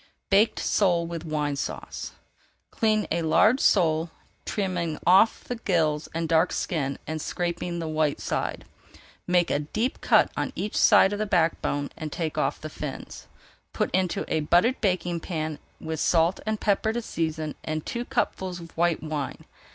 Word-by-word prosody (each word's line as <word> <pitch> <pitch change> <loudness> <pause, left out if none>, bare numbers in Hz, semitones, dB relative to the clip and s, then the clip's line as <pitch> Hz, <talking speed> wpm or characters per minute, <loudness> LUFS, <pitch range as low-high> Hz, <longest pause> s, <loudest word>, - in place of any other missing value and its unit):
BAKED 205 +3 +4
SOLE 175 -4 +2
WITH 165 -1 -6
WINE 150 -2 -1
SAUCE - - -5 0.6
Clean 215 -1 +1
a 170 - +1
large 210 +10 +4
sole, 165 -6 +3 0.4
trimming 175 -6 -2
off 190 +5 +5
the 245 - -5
gills 160 -8 0
and 165 0 -2
dark 165 +2 +3
skin 140 -6 -2
and 155 0 -4
scraping 175 +1 -3
the 165 -1 -3
white 155 -2 0
side. - - -3 0.6
Make 180 -1 +2
a 145 - +2
deep 215 - -2
cut - - +4
on - - -2
each 210 - -3
side 190 - +6
of 205 - -3
the 215 - -1
back 165 -4 +2
bone 145 0 -2
and 155 -1 -6
take 160 -1 -3
off - - 0
the - - -6
fins. - - -7 0.5
Put - - -1
into 185 -2 0
a - - 0
buttered 175 - +2
baking 180 -4 0
pan 155 -3 -4 0.2
with 160 -1 -4
salt 170 +2 +2
and 215 -1 -1
pepper 210 +1 +1
to 240 - -2
season 160 -5 -3
and 155 -1 -3
two 240 - -3
cupfuls 190 -8 -2
of 165 -1 -12
white 170 -1 +1
wine. 150 -3 -4
170 Hz, 165 wpm, -26 LUFS, 155-195 Hz, 0.6 s, side